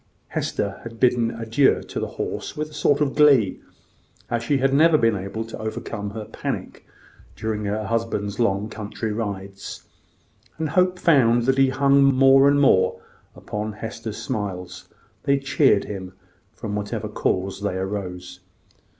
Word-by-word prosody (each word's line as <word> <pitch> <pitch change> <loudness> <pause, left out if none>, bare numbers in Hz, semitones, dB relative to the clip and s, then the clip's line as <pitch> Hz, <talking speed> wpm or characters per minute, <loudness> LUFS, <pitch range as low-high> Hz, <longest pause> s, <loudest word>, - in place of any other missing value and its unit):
Hester 100 -1 -2
had 115 -1 -10
bidden 120 -2 +3
adieu 115 +4 +1
to - - -5
the - - -2
horse - - -4
with 155 0 -3
a - - -15
sort 145 -1 +2
of 140 -2 +1
glee, 140 -10 +4 0.7
as 120 -1 0
she 140 +4 +1
had 135 0 +1
never 155 +2 +5
been 115 -5 +2
able 100 +4 -4
to 115 - -8
overcome 110 -1 -4
her 105 +1 -6
panic - - -6 0.5
during 110 -1 -3
her 105 +2 -2
husband's 110 -2 -2
long 100 -3 +1
country 110 0 -5
rides; 100 -3 -5 0.7
and 160 -1 -2
Hope 180 +2 +2
found 120 -9 +4
that 135 +2 +2
he 135 -1 +5
hung 140 +1 +3
more 135 0 +6
and 145 0 +4
more 130 -9 +3 0.4
upon 105 +1 -5
Hester's 110 0 -6
smiles: 90 -6 -5 0.4
they 140 0 +3
cheered 135 -5 +3
him, 95 -3 -7 0.4
from 105 - -6
whatever 105 0 -3
cause 95 +2 -2
they 100 -2 -1
arose. 95 -2 -5
115 Hz, 150 wpm, -23 LUFS, 100-135 Hz, 0.7 s, more